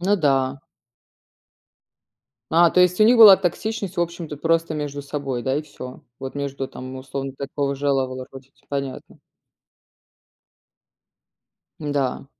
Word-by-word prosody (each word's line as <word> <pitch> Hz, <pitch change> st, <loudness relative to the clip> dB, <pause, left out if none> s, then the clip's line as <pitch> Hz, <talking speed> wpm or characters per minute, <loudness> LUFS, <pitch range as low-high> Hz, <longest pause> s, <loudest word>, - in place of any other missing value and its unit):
Ну 195 Hz, +3 st, +2 dB
да. 135 Hz, -4 st, +1 dB, 1.9 s
А, 170 Hz, +1 st, +6 dB
то 180 Hz, -, +4 dB
есть 180 Hz, +1 st, +3 dB
у -, -, +9 dB
них 240 Hz, +2 st, +5 dB
была 210 Hz, -4 st, +11 dB
токсичность, 195 Hz, +2 st, -3 dB
в 175 Hz, -, +2 dB
общем-то, 170 Hz, -3 st, -4 dB
просто 165 Hz, 0 st, +1 dB
между 145 Hz, -1 st, -4 dB
собой, 140 Hz, -3 st, -4 dB
да, 130 Hz, 0 st, 0 dB
и 150 Hz, -, 0 dB
всё? 130 Hz, -4 st, -10 dB, 0.2 s
Вот 135 Hz, +1 st, -7 dB
между 140 Hz, -1 st, -4 dB
там, 130 Hz, +1 st, -9 dB
условно, 135 Hz, 0 st, -6 dB
такого 140 Hz, 0 st, -2 dB
жела 140 Hz, -1 st, +1 dB
вала 130 Hz, 0 st, -7 dB
ротить, 135 Hz, +1 st, -15 dB
понятно. 140 Hz, -2 st, -5 dB, 2.6 s
Да. 145 Hz, -4 st, -2 dB
145 Hz, 130 wpm, -22 LUFS, 135-170 Hz, 2.6 s, была